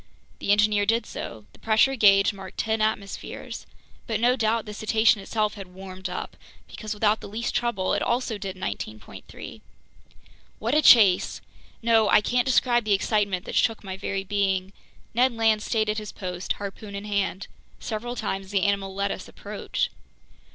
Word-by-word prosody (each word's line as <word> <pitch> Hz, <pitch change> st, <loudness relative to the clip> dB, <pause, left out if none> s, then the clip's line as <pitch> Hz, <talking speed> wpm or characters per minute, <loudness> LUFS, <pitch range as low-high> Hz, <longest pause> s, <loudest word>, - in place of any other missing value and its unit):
The -, -, 0 dB
engineer 210 Hz, 0 st, +3 dB
did 230 Hz, +2 st, +2 dB
so. 110 Hz, -2 st, -7 dB
The -, -, -19 dB
pressure 225 Hz, +5 st, +3 dB
gauge 200 Hz, -3 st, +5 dB
marked 195 Hz, -1 st, -10 dB
ten 220 Hz, 0 st, 0 dB
atmospheres. 215 Hz, -2 st, -3 dB, 0.4 s
But 220 Hz, -3 st, -1 dB
no 245 Hz, +2 st, +4 dB
doubt 225 Hz, -2 st, 0 dB
the 210 Hz, -, -7 dB
cetacean 220 Hz, 0 st, +2 dB
itself 215 Hz, +1 st, -1 dB
had 195 Hz, -3 st, -9 dB
"warmed 190 Hz, 0 st, -7 dB
up," 180 Hz, -, -5 dB, 0.3 s
because 215 Hz, -1 st, -6 dB
without 210 Hz, +1 st, +2 dB
the -, -, -8 dB
least 225 Hz, +3 st, -3 dB
trouble, 220 Hz, -6 st, 0 dB
it -, -, 0 dB
also 235 Hz, -3 st, -1 dB
did 190 Hz, -1 st, -5 dB
19.3. 110 Hz, -, -7 dB, 1.0 s
What 230 Hz, +4 st, -2 dB
a 305 Hz, -, +5 dB
chase! 205 Hz, -10 st, +6 dB, 0.4 s
No, 225 Hz, -2 st, +4 dB
I -, -, +7 dB
can't 245 Hz, +4 st, 0 dB
describe 245 Hz, -2 st, +3 dB
the 210 Hz, -1 st, +2 dB
excitement 200 Hz, -2 st, 0 dB
that -, -, -6 dB
shook 225 Hz, -1 st, +1 dB
my 190 Hz, -1 st, -5 dB
very 195 Hz, 0 st, -3 dB
being. 195 Hz, -1 st, 0 dB, 0.4 s
Ned 250 Hz, +2 st, +3 dB
Land 225 Hz, -2 st, +2 dB
stayed 215 Hz, 0 st, 0 dB
at 210 Hz, +1 st, 0 dB
his 210 Hz, -1 st, -7 dB
post, 180 Hz, -1 st, -4 dB
harpoon 200 Hz, 0 st, -7 dB
in 200 Hz, +1 st, -6 dB
hand. 200 Hz, -2 st, -1 dB, 0.3 s
Several 235 Hz, +3 st, -4 dB
times 195 Hz, -4 st, -3 dB
the 195 Hz, -2 st, +1 dB
animal 195 Hz, -1 st, 0 dB
let 200 Hz, 0 st, 0 dB
us -, -, -6 dB
approach. -, -, -4 dB
210 Hz, 170 wpm, -25 LUFS, 195-225 Hz, 1.0 s, I